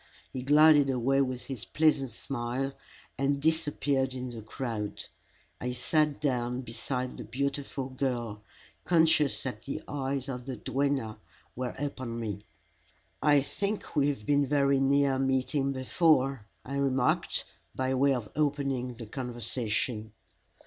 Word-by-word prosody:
he 130 - -3
glided 145 +1 +6
away 135 +2 +2
with 130 -2 -1
his 130 -6 -6
pleasant 150 -4 +2
smile 125 +3 -3 0.5
and 140 +1 +2
disappeared 145 -4 +1
in 125 -1 -4
the 115 -2 -7
crowd. 110 -1 -4 0.6
I 125 0 -2
sat 150 +4 +1
down 125 -3 0
beside 125 +2 -4
the - - -6
beautiful 135 +3 -3
girl, 120 -5 -2 0.4
conscious 160 -4 +3
that 125 -5 -4
the 140 +5 -5
eyes 135 -1 -2
of 125 -1 -5
the 130 - -3
duenna 135 -1 -1 0.4
were 125 0 -3
upon 130 -4 -4
me. 105 -3 -4 0.8
"I 145 -1 +5
think 200 +9 -3
we 145 -1 +4
have 135 -8 -2
been 145 -1 +3
very 140 -1 +3
near 135 0 +3
meeting 135 +1 +1
before," 135 -3 +2 0.2
I 140 +2 -3
remarked, 135 -2 +1 0.3
by 130 0 0
way 135 +1 +4
of 120 -4 -4
opening 140 -4 0
the 115 0 -7
conversation. 120 -2 -2
135 Hz, 135 wpm, -30 LUFS, 125-140 Hz, 0.8 s, glided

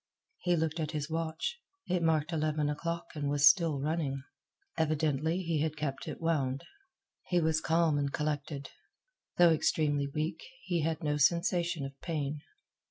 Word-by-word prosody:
He 175 -1 +2
looked 160 0 -1
at 155 0 -2
his 150 +1 -3
watch. 165 - -2 0.3
It 180 -1 0
marked 160 0 +1
eleven 155 -1 +1
o'clock 170 +3 -4
and 145 -2 -2
was 145 0 +5
still 165 -6 +4
running. 140 -2 -1 0.5
Evidently 155 +2 +1
he 165 -3 0
had 155 0 -1
kept 140 -3 -3
it - - -5
wound. 140 -5 0 0.6
He 180 - +2
was 160 -1 +2
calm 160 -2 +2
and 140 -1 -1
collected. 145 -1 -3 0.7
Though 175 -1 +7
extremely 150 -2 +1
weak, 155 +3 -3 0.2
he 175 -3 0
had 160 +1 -1
no 150 -1 +1
sensation 170 0 +2
of 135 - -6
pain. 150 -3 -2
155 Hz, 155 wpm, -31 LUFS, 145-165 Hz, 0.7 s, Though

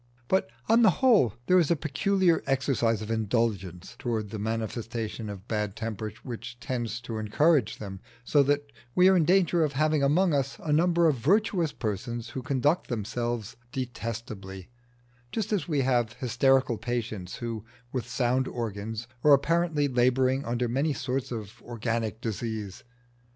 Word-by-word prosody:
But 190 -10 +1 0.2
on 230 +1 +5
the 220 - +7
whole 210 - +4
there 185 +5 +5
is 165 - +2
a 170 - +4
peculiar 170 +4 +2
exercise 125 -5 +1
of 110 - -5
indulgence 105 -5 -1
towards 110 -4 -2
the 110 - -4
manifestations 110 0 -3
of 100 +1 -8
bad 105 -2 -2
temper 110 -2 -4
which 120 0 -7
tends 120 -2 -3
to 115 -2 -5
encourage 125 +3 +2
them, 95 -2 -7 0.2
so 145 +4 +4
that 145 +1 0 0.2
we 180 +1 +7
are 190 - +5
in 170 -4 +4
danger 175 -2 +3
of 150 -2 0
having 155 +1 +2
among 160 +5 +3
us 140 -1 0
a 150 - 0
number 170 +1 +4
of 150 -4 +2
virtuous 185 - +2
persons 115 +2 -4
who 130 - -5
conduct 140 +5 +1
themselves 120 0 -3 0.2
detestably, 115 -7 -6 0.6
just 220 -1 -2
as 200 - 0
we 150 -5 +1
have 120 -3 +1
hysterical 130 -1 +2
patients 110 -7 -3
who, 115 -3 -5 0.3
with 125 -3 -2
sound 130 +1 +1
organs, 110 0 -4 0.2
are 150 - +7
apparently 160 +1 +2
labouring 130 +1 +2
under 120 +1 0
many 140 +6 0
sorts 130 0 -3
of 115 0 -7
organic 115 -1 -3
disease. 110 -3 -4
120 Hz, 155 wpm, -28 LUFS, 110-145 Hz, 0.6 s, the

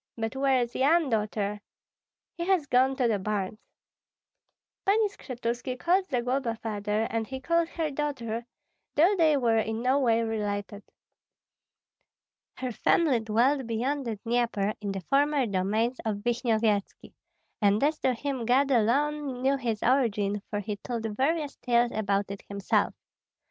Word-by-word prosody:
But 225 +2 -3
where 265 -2 +2
is 240 +1 -7
Yan, 305 +3 +3
Daughter?" 210 -1 -1 0.7
"He 340 - -3
has 375 -6 +2
gone 260 0 +3
to 255 -2 +1
the 215 -3 +1
barns." 205 +1 -3 1.2
Pani 420 +2 +3
Skshetuski 250 -6 -4
called 370 +6 +1
Zagloba 250 -2 -1
father, 210 -1 -1
and 225 -1 -1
he 265 0 -5
called 335 +4 +1
her 320 -3 -2
daughter, 245 -6 -3 0.5
though 350 +7 +5
they 315 -5 +4
were 230 -4 +2
in 220 +1 -2
no 260 +3 +3
way 230 -3 +2
related. 205 -2 -3 1.8
Her 255 -1 -3
family 275 +2 +2
dwelt 235 +5 +1
beyond 260 +5 -1
the 225 - -2
Dnieper, 230 -3 0
in 200 -1 -2
the 195 -1 -4
former 280 - +2
domains 215 +5 0
of 205 -2 -3
Vishnyevetski; 225 -4 0 0.5
and 205 +3 +3
as 300 +1 +1
to 255 -1 +1
him 270 0 -3
God 270 +3 +3
alone 265 +3 +1
knew 270 +1 +3
his 235 -5 -2
origin, 210 -6 +1
for 205 -1 -2
he 205 0 -4
told 230 +2 -5
various 295 +3 0
tales 240 -1 +2
about 200 -2 -1
it 200 - -7
himself. 200 -1 0
240 Hz, 145 wpm, -28 LUFS, 215-275 Hz, 1.8 s, though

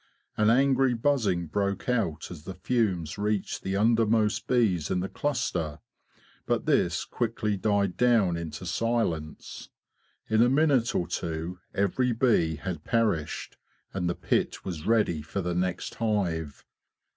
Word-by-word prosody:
An 110 0 +3
angry 135 +1 +4
buzzing 115 -9 +1
broke 100 +3 -2
out 100 -13 -1
as 80 -2 -10
the 95 - -6
fumes 95 -5 -1
reached 105 -1 -1
the 95 0 -2
under 115 +3 +4
most 110 0 +1
bees 105 - +2
in 90 - 0
the 95 - -2
cluster, 90 - -2 0.7
but - - 0
this - - +2
quickly 110 -3 -1
died 100 -1 0
down 115 -8 +3
into 85 +1 -6
silence. 85 -6 -2 0.6
In 110 +1 +3
a 120 - +5
minute 135 -4 +3
or 85 - 0
two 85 +1 -4 0.2
every 120 +6 +1
bee 110 -10 +2
had 85 0 -5
perished, 105 -10 -1 0.4
and 90 -2 -1
the 85 - -1
pit - - -1
was 85 -4 -5
ready 105 -9 +2
for 80 +6 -5
the 90 -1 -2
next 90 0 -2
hive. 90 -10 -2
100 Hz, 145 wpm, -27 LUFS, 85-115 Hz, 0.7 s, a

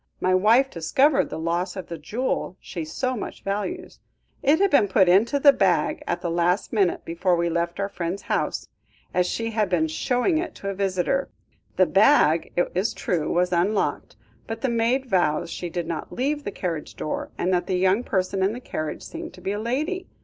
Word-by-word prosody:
My 185 - +2
wife 225 +8 +4
discovered 265 - +2
the - - -5
loss 170 +3 -2
of 190 -3 -5
the 170 -1 -7
jewel 210 - -2
she 170 - -6
so 255 +11 -2
much 215 - -7
values. 210 - -4 0.4
It 290 +3 +4
had 400 0 +3
been 220 -8 +5
put 190 -1 +4
into 210 +10 +4
the 280 0 +7
bag 180 - +1
at 175 - -1
the 170 - -2
last 175 +5 +1
minute 195 -5 +1
before 175 +2 +1
we 170 0 0
left 170 +2 -2
our 200 - 0
friends' 180 0 -4
house, - - -1 0.5
as 180 0 +2
she 230 +3 -2
had 215 -3 0
been 165 -3 +2
showing 250 - 0
it 345 - -4
to 195 - -5
a - - -2
visitor. 195 +7 0 0.5
The 185 - +5
bag, 195 - +4
it 175 - +1
is 190 +5 0
true, 165 -5 -1
was 180 +1 +1
unlocked, 190 +5 0 0.3
but 225 0 -5
the 265 - 0
maid 235 +3 +1
vows 175 -8 +1
she 175 - -5
did 175 0 -3
not 165 -1 -5
leave 290 +3 -2
the - - -3
carriage 170 -5 -4
door, 155 - -4
and 185 +1 0
that 175 -1 0
the 185 - 0
young 190 +5 +2
person 190 -2 -1
in 195 +3 +2
the 245 - -6
carriage 155 -10 -5
seemed - - -8
to 180 - -14
be 195 - -2
a 205 - -2
lady. 300 - -2
190 Hz, 205 wpm, -24 LUFS, 175-235 Hz, 0.5 s, the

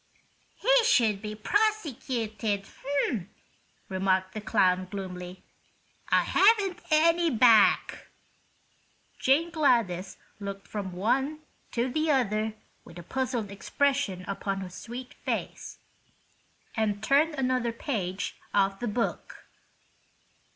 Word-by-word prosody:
"He - - +4
should 225 - +3
be 215 -1 -5
prosecuted," 235 - -1 1.2
remarked 190 0 0
the 215 - -5
clown, 185 -2 +2
gloomily. 180 -2 -7 0.7
"I - - +4
haven't 395 -3 +3
any 335 +2 +4
back." 230 -5 +4 1.1
Jane 310 +6 +2
Gladys 230 - +1 0.2
looked 200 -1 -7
from 200 -3 -5
one 265 +11 0 0.3
to 240 +1 0
the 310 +5 -1
other 220 -5 +1 0.3
with 170 - -14
a 175 - -8
puzzled 245 - -2
expression 205 -3 -1
upon 195 0 -3
her 185 -1 -7
sweet 245 +6 -8
face, - - -4 1.0
and 210 -2 -1
turned 295 +6 +3
another 255 -3 0
page 205 -6 -3 0.2
of 195 -1 +2
the 240 - -3
book. 230 +2 -3
225 Hz, 100 wpm, -28 LUFS, 195-280 Hz, 1.2 s, He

